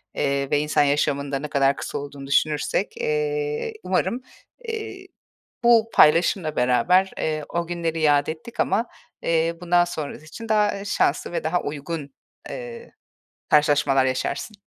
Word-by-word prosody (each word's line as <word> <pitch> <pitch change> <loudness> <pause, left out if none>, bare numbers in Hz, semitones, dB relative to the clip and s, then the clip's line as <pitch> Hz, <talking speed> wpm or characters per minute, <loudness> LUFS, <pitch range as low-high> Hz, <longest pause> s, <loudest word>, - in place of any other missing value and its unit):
Eee, 140 0 0
ve 145 - +3
insan 150 0 +2
yaşamında 140 -1 0
ne 150 - -5
kadar 140 -1 +2
kısa - - -5
olduğunu 140 -1 -8
düşünürsek, 150 - 0
eee, 455 -1 -1
umarım, 245 - 0 0.5
eee, 445 -1 -6 0.6
bu 230 -1 +5
paylaşımla 160 0 +4
beraber, 150 +11 +3
eee, 155 -1 -2
o 170 -1 -2
günleri 165 -2 -2
yâd 145 -2 +3
ettik 160 +9 -7
ama, 225 +5 +1 0.4
eee, 165 0 +1
bundan 175 0 +3
sonrası 155 -3 -6
için 225 +8 -9
daha, 210 -1 +3
eee, 200 - -8
şanslı 160 -7 0
ve 175 - -3
daha 160 +3 0
uygun, 145 0 -5 0.4
eee, 485 -1 -8 0.6
karşılaşmalar 145 -2 +4
yaşarsın. 140 - -3
160 Hz, 140 wpm, -23 LUFS, 145-210 Hz, 0.6 s, bu